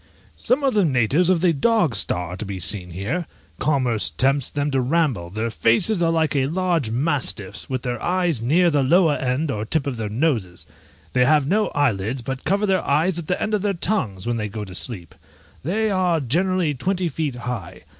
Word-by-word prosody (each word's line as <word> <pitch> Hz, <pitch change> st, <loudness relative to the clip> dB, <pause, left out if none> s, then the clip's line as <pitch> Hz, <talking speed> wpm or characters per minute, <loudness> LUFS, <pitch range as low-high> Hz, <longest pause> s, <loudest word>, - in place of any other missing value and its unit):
Some 265 Hz, +4 st, 0 dB
of 270 Hz, -, +2 dB
the 210 Hz, -2 st, +3 dB
natives 140 Hz, -, +2 dB
of 180 Hz, -3 st, +2 dB
the 180 Hz, -2 st, +3 dB
dog 175 Hz, -, +2 dB
star 90 Hz, -4 st, -1 dB
are 90 Hz, -, -6 dB
to -, -, -5 dB
be 100 Hz, -2 st, -6 dB
seen 90 Hz, 0 st, +3 dB
here; 115 Hz, -, -3 dB, 0.3 s
commerce 130 Hz, -7 st, +1 dB
tempts 135 Hz, +1 st, +1 dB
them 145 Hz, 0 st, -2 dB
to 135 Hz, -1 st, +1 dB
ramble; 130 Hz, -, 0 dB
their 110 Hz, +5 st, -3 dB
faces 170 Hz, -, +2 dB
are 165 Hz, -, +3 dB
like 160 Hz, -2 st, +1 dB
large 160 Hz, 0 st, 0 dB
mastiffs', 125 Hz, -, -2 dB
with 130 Hz, -2 st, -3 dB
their 120 Hz, -3 st, -3 dB
eyes 175 Hz, -8 st, 0 dB
near 165 Hz, +9 st, +3 dB
the 145 Hz, -2 st, +2 dB
lower 160 Hz, +4 st, +4 dB
end 135 Hz, +4 st, -1 dB
or 105 Hz, -5 st, -3 dB
tip 135 Hz, +6 st, -1 dB
of 135 Hz, -4 st, -3 dB
their 110 Hz, -2 st, -3 dB
noses: 110 Hz, -, -1 dB, 0.5 s
they 125 Hz, -, +3 dB
have 150 Hz, 0 st, +3 dB
no 210 Hz, +8 st, +1 dB
eyelids, 120 Hz, -3 st, 0 dB
but 135 Hz, +2 st, -5 dB
cover 200 Hz, +2 st, +1 dB
their 190 Hz, -2 st, +1 dB
eyes 160 Hz, +5 st, +1 dB
with 170 Hz, -3 st, -5 dB
the 180 Hz, -, -1 dB
end 215 Hz, -, -2 dB
of 210 Hz, -, +1 dB
their 205 Hz, 0 st, 0 dB
tongues 115 Hz, -, -1 dB
when 120 Hz, 0 st, -1 dB
they 105 Hz, -1 st, -3 dB
go 105 Hz, 0 st, -6 dB
to 95 Hz, -, -10 dB
sleep; 95 Hz, -4 st, -4 dB, 0.5 s
they 210 Hz, +8 st, 0 dB
are 180 Hz, -3 st, +1 dB
generally 170 Hz, +4 st, 0 dB
twenty 180 Hz, +6 st, -1 dB
feet 150 Hz, -3 st, -3 dB
high. 120 Hz, -7 st, -6 dB
140 Hz, 205 wpm, -22 LUFS, 115-175 Hz, 0.5 s, lower